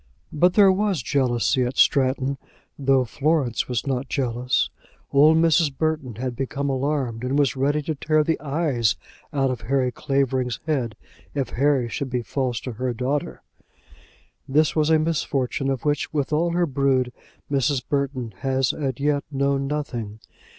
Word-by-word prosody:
But 180 +4 +3
there 200 -2 +7
was 195 -2 0
jealousy 130 -2 +1
at 125 +1 -3
Stratton, 135 0 +2 0.4
though 135 -2 +3
Florence 140 -1 0
was 125 0 -2
not 135 -1 -2
jealous. 125 -1 0 0.4
Old 150 +3 +6
Mrs. 160 -3 +3
Burton 155 -7 -1
had 125 +2 -4
become 135 +2 -2
alarmed, 130 -4 -1
and 130 +3 0
was 140 -4 +2
ready 145 +3 +1
to 160 - -2
tear 155 +1 +1
the 160 +1 0
eyes 140 -7 0 0.4
out 135 -2 +1
of 125 -3 -4
Harry 130 +2 0
Clavering's 130 -2 -1
head 130 -8 -1 0.4
if 135 -4 -1
Harry 135 -1 +2
should 135 +3 -4
be 125 -1 -2
false 125 -2 -2
to 125 - -5
her 125 +2 -3
daughter. 125 - -2 1.1
This 150 +3 +3
was 155 -1 +2
a 160 - +5
misfortune 140 -4 -1
of 135 0 -2
which, 145 -1 0
with 145 -1 -1
all 165 +3 +2
her 175 0 +2
brood, 130 -3 +1 0.4
Mrs. 135 -1 +1
Burton 135 -5 -2
had 135 -1 -1
as 135 -3 +2 0.2
yet 145 0 +1
known 140 -1 0
nothing. 120 -8 -4
135 Hz, 155 wpm, -23 LUFS, 125-150 Hz, 1.1 s, there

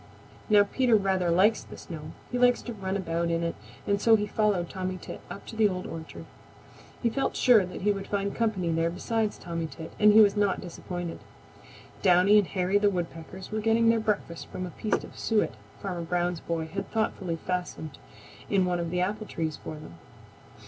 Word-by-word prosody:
Now 205 -1 +7
Peter 240 +3 +2
rather 190 -3 +2
likes 195 +6 +4
the - - -11
snow. 155 -2 -8 0.2
He 245 - -1
likes 245 0 +4
to 240 - -5
run 195 -2 -3
about 170 -2 -1
in 170 0 0
it, 170 - -1 0.3
and 200 0 +1
so 225 -1 +6
he 210 -1 0
followed 205 -4 +1
Tommy 185 0 -4
Tit - - -8
up 200 - -8
to - - -9
the 220 -1 +4
Old 185 -1 -4
Orchard. 160 -1 -8 0.8
He 235 - +4
felt 270 +3 -1
sure 235 -5 +6
that 180 - -8
he 205 - +4
would 195 -1 -4
find 200 -1 -1
company 210 -7 0
there 165 +1 +1
besides 215 +5 -1
Tommy 170 -2 -4
Tit, 160 +1 -9
and 210 0 +7
he 220 - +8
was 205 -2 +6
not 205 -1 +2
disappointed. 175 -1 -6 0.8
Downy 190 +3 +6
and 200 - 0
Hairy 190 +2 +1
the 205 0 +4
Woodpeckers 180 +1 -5
were 215 0 -1
getting 225 +1 +3
their 230 0 +4
breakfast 210 -6 -2
from 185 - -5
a 180 - -7
piece 215 - -1
of - - -11
suet 220 -2 +1 0.3
Farmer 180 -3 -3
Brown's 175 0 -1
boy 165 -1 -3
had 180 +5 -5
thoughtfully 195 -6 -1
fastened 175 -3 -4 0.5
in 190 -2 +3
one 180 -1 0
of 170 -1 -2
the 180 +1 0
apple 210 +3 -2
trees 160 -2 -3
for - - -5
them. 120 - -11
190 Hz, 200 wpm, -28 LUFS, 170-210 Hz, 0.8 s, he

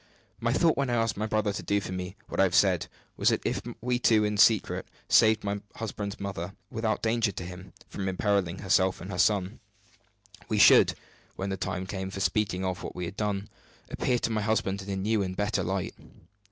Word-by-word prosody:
My 115 0 0
thought, 160 +5 +3
when 140 -2 0
I 120 - +1
asked 115 -1 +1
my 105 +2 -2
brother 105 -1 0
to - - -4
do 100 - +1
for 95 - -6
me 90 +1 -5
what - - -5
I - - +7
have 90 -3 0
said, 90 -2 +3 0.3
was, - - +4
that - - -1
if - - -1 0.2
we 125 +1 0
two 110 -3 +4
in 105 0 0
secret 105 0 +3 0.2
saved 110 -1 +5
my 100 0 -2
husband's 105 -2 -5
mother, 100 -1 -5 0.2
without 110 -1 -1
danger 115 -2 +2
to 90 - -6
him, 90 +1 -9 0.2
from 95 -1 -4
imperiling 95 -2 0
herself 95 -1 +2
and 95 +3 -7
her 90 - -4
son, 100 -1 +2 0.9
we - - 0
should, - - +7 0.4
when 95 +1 -3
the - - -1
time 95 0 -3
came 95 0 -4
for 100 - -6
speaking 95 0 0
of 95 -1 -2
what - - -7
we 90 - -3
had 90 +3 -7
done, 105 -1 -2 0.4
appear 125 - +1
to 115 - -1
my 110 -1 0
husband 105 -2 0
in 100 - -9
a 100 - -1
new 105 +3 0
and 95 -1 -3
better 105 0 0
light. - - -2
100 Hz, 215 wpm, -28 LUFS, 95-110 Hz, 0.9 s, I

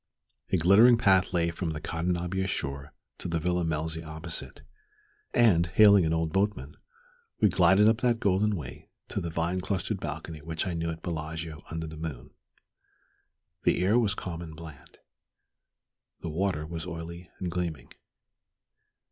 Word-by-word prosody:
A 95 - +4
glittering 100 +8 +6
path 95 -4 +4
lay 85 -1 +1
from 85 -1 -3
the 75 - -5
Cadenabia 90 +4 -2
shore 70 -4 -4 0.3
to - - -5
the 85 -1 -1
Villa 90 +2 0
Melzi 80 0 -2
opposite; 80 +1 -6 0.7
and, 95 -8 +4
hailing 100 0 +6
an - - 0
old 80 -1 0
boatman, 95 -8 -1 0.6
we 105 - +5
glided 95 +3 +5
up 110 +2 +3
that 120 -2 +2
golden 100 +1 +2
way 75 -8 -8 0.2
to - - -2
the 85 - -3
vine 85 +3 -1
clustered 95 +2 -2
balcony 80 +1 -6
which 80 +3 -3
I 90 - -2
knew 85 0 -2
at 80 0 -6
Bellagio 80 -1 -5
under 80 0 -4
the 80 0 -8
moon. 75 -7 -6 1.3
The - - +2
air 110 +5 +4
was 105 -4 +1
calm 85 -3 -5
and 80 -2 -8
bland. 80 -4 -12 1.2
The 85 - -4
water 85 -2 -1
was 80 +1 -6
oily 85 +1 -7
and 90 -2 -4
gleaming. 85 -3 -3
85 Hz, 155 wpm, -28 LUFS, 80-95 Hz, 1.3 s, glittering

